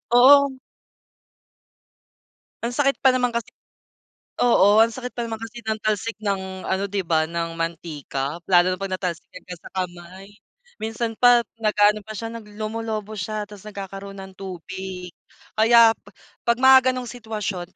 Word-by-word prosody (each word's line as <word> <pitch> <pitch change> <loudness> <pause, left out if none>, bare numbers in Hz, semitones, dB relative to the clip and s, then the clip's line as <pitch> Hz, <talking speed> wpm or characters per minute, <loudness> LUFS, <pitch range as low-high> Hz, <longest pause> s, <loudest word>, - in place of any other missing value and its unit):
Oo. 280 +2 +7 2.1
Ang 235 - -1
sakit 275 +2 +2
pa 265 - +7
naman 250 -2 0
kasi. 235 - -3 0.9
Oo, 210 -3 +5
ang 225 - +7
sakit 250 +2 -7
pa 235 -1 -4
naman 225 - -3
kasi 225 +2 -9
ng 220 - +1
talsik 215 +1 -1
ng 190 -2 -3
ano, 190 +1 -1
di 200 -1 -2
ba, 160 -2 +1
ng 170 0 -3
mantika 155 -3 -4
lalo 180 -1 +5
na 185 - -7
'pag 195 - -3
natalsikan 175 -3 -6
ka 180 - -8
sa - - -13
kamay. 185 +1 -6 0.5
Minsan 225 +1 -3
pa 245 -1 +6 0.2
nag-aano 210 -1 +3
pa 215 - -7
siya, 225 +2 -5
nag 230 -2 -9
lumulubo 215 0 -4
siya 215 +1 -3
ta's 205 0 -12
nagkakaroon 195 -1 -8
ng 190 0 -12
tubig. 185 -1 -7 0.5
Kaya 230 0 +7 0.6
'pag 235 -1 +3
mga 260 -1 +7
gano'ng 255 -1 -3
sitwasyon, 210 -6 -5
210 Hz, 150 wpm, -23 LUFS, 185-230 Hz, 2.1 s, Oo